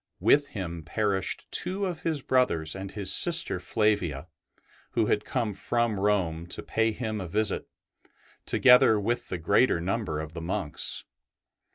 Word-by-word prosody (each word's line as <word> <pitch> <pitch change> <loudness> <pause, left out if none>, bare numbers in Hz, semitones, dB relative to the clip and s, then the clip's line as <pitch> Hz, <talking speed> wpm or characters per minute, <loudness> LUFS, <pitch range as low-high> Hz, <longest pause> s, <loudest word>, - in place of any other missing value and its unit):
With 145 0 +3
him 85 -7 -6
perished 95 +3 -2
two 195 +2 -1
of 175 -4 -4
his 155 -5 -2
brothers 85 -12 +1
and 95 0 -7
his 100 -2 +3
sister 165 - +4
Flavia, 90 - -1 0.7
who 115 - +1
had 105 0 0
come 115 -5 -2
from 115 +1 -1
Rome 90 -5 0
to - - -4
pay 115 0 0
him 110 -2 -4
a 90 - -5
visit, 105 +3 -1 0.8
together 125 -4 +5
with 120 +4 -2
the 90 - -3
greater 85 +4 +2
number 95 -3 -2
of 80 0 -7
the 85 - -7
monks. 85 -2 -2
105 Hz, 150 wpm, -27 LUFS, 85-120 Hz, 0.8 s, together